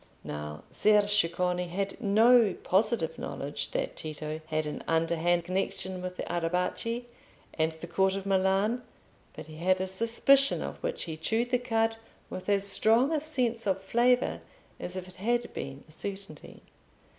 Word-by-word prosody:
Now 75 +1 -6
Ser 210 -1 +4
Ceccone 180 -2 +1
had 195 +5 -3
no 225 0 +5
positive 190 -3 +1
knowledge 145 +1 -4
that - - -2
Tito 155 0 -5
had 155 -1 -1
an 150 - -5
underhand 165 +1 +2
connection 185 0 -2
with 180 0 -5
the - - -3
Arrabbiati 180 +8 -1 0.5
and 160 0 0
the 160 +1 -9
Court 190 +2 +1
of 195 0 -4
Milan, 195 +5 +2 0.5
but - - -8
he 155 -1 -11
had 185 +3 +2
a 190 - 0
suspicion 230 +8 +3
of - - -6
which - - -2
he 160 -2 -5
chewed 225 +9 0
the 250 - +3
cud 225 -2 0 0.3
with 185 +2 -5
as 200 -1 +2
strong 225 +7 +3
a 315 - +2
sense 250 -7 -1
of 190 -1 +1
flavour 240 +6 +2 0.4
as 180 - -5
if 185 -1 -5
it 185 - -13
had 240 +4 -1
been 135 0 -6
a - - -18
certainty. 195 -2 -8
190 Hz, 160 wpm, -29 LUFS, 170-225 Hz, 0.5 s, no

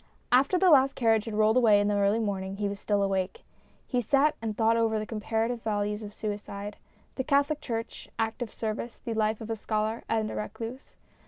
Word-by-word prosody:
After 270 +8 +4
the 365 -1 +5
last 275 -2 +5
carriage 225 -3 +2
had 225 -2 -4
rolled 215 +2 +4
away 220 -5 +6
in 205 - +2
the 205 - +1
early 200 +1 +3
morning, 195 -3 -2
he 205 0 -1
was 200 0 -5
still 205 -1 +1
awake. 190 -1 -1 0.4
He 250 -2 0
sat 280 +6 +3
and 220 -2 -3
thought 225 0 +3
over 225 -1 +2
the 215 - -2
comparative 225 +2 -2
values 210 -1 -1
of 210 -1 -7
suicide, 205 -1 -5 0.4
the 260 - 0
Catholic 285 +2 +2
Church, 230 -4 -5
active 225 +1 -2
service, 225 +1 -4
the 235 - -5
life 220 0 0
of 225 0 -5
a - - 0
scholar 215 +1 -2
and 220 -1 0
a - - -5
recluse. 230 +4 -6
220 Hz, 200 wpm, -28 LUFS, 210-235 Hz, 0.4 s, away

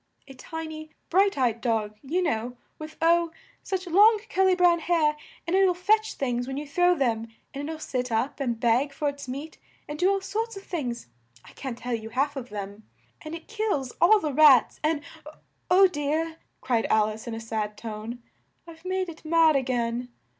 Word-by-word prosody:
A 270 - -11
ti 320 +5 -7
ny 310 0 -8 0.2
bright 390 +1 +3
eyed 235 -3 +1
dog, 220 -3 -1
you 340 +7 -1
know, 245 -5 -2 0.2
with 310 0 -9
oh! 340 0 +4 0.3
such 380 -1 -3
long 415 +5 +6
cur 385 - +2
ly 375 -1 +4
brown 350 -1 +4
hair! 320 -3 +2 0.3
And 340 +3 0
it'll 380 -2 +4
fetch 430 +4 +1
things 245 -2 -2
when 265 0 -4
you 295 - -4
throw 355 +4 +3
them, 230 -6 0 0.3
and 285 +2 -5
it'll 320 - -4
sit 250 -5 -3
up 230 +7 -1
and 240 -4 -2
beg 250 +4 +2
for 290 +1 -1
its 285 -1 -8
meat 280 +5 -7 0.3
and 295 0 -6
do 365 - +4
all 395 0 +2
sorts 445 +3 -3
of 390 - -9
things 250 -11 -4 0.4
I - - -14
can't 260 -4 -6
tell 245 0 -4
you 220 -1 -4
half 275 +5 0
of 255 -3 -6
them. 205 +1 -8 0.3
And 310 +1 -6
it 335 - -11
kills 415 - -2
all 425 +5 +7
the 305 -6 -3
rats, 280 -4 +6
and 305 -1 0 0.2
m 300 - -10 0.4
oh 375 +2 +7
dear!" 320 0 -1 0.2
cried 235 -3 0
Al 215 -1 +3
ice 220 +2 -8
in 230 - -4
a - - -5
sad 215 -2 -4
tone, 225 +2 -7 0.4
"I've 325 -1 -13
made 370 0 -1
it 325 -2 -10
mad 320 -1 +4
a 275 - +3
gain!" 245 -1 -2
295 Hz, 205 wpm, -26 LUFS, 240-345 Hz, 0.4 s, all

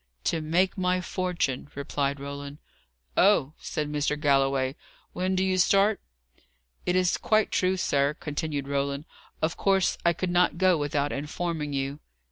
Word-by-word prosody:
"To 160 - 0
make 180 +5 +1
my 180 0 +2
fortune," 180 -8 -2
replied 140 0 -2
Roland. 140 +1 -7 0.6
"Oh!" 170 -7 +4
said 150 -1 -3
Mr. 150 0 -1
Galloway. 135 -2 +2 0.4
"When 185 +1 -1
do 185 - +2
you 185 -1 +1
start?" 195 +3 +4 0.9
"It 180 - +2
is 185 -1 +2
quite 215 -1 +2
true, 185 +1 +1
sir," 140 -4 +1
continued 145 -2 -3
Roland. 140 +1 -1 0.4
"Of 160 +2 0
course 195 -2 +2
I 170 - +4
could 180 +2 -2
not 175 -1 +3
go 185 0 +4
without 145 -1 -1
informing 150 +1 -3
you." 140 +1 -2
155 Hz, 145 wpm, -27 LUFS, 140-185 Hz, 0.9 s, Oh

